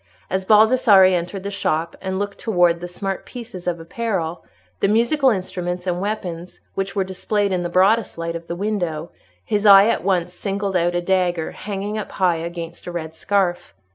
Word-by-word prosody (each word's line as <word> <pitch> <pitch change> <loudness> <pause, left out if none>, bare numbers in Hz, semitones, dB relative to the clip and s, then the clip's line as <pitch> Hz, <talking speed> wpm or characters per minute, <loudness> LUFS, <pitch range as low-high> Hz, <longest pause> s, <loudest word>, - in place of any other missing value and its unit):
As 190 0 -1
Baldassarre 215 -3 +6
entered 180 +2 -2
the 200 - -4
shop, 165 -4 -1
and 190 0 -3
looked 205 0 -4
towards 175 -6 +2
the 175 - -4
smart 195 +2 -4
pieces 225 -8 -9
of 170 -1 -1
apparel, 175 -2 -3 0.4
the - - +2
musical 240 +7 +3
instruments, 180 -3 -3
and 180 -1 -1
weapons, 180 -4 -4
which 195 +1 -3
were 195 - +2
displayed 200 +2 -1
in 180 -1 0
the 175 - -3
broadest 195 +4 +2
light 165 0 -3
of 170 0 -7
the 170 - -4
window, 175 -5 -2 0.3
his 210 -1 0
eye 200 +1 +9
at - - 0
once 180 -2 0
singled 195 +1 -3
out 175 0 +1
a 175 - +1
dagger 175 -2 0
hanging 205 +1 -4
up 210 - -7
high 180 -3 +2
against 170 +1 -7
a - - -4
red 160 -2 -5
scarf. 180 - -1
185 Hz, 185 wpm, -21 LUFS, 175-200 Hz, 0.4 s, eye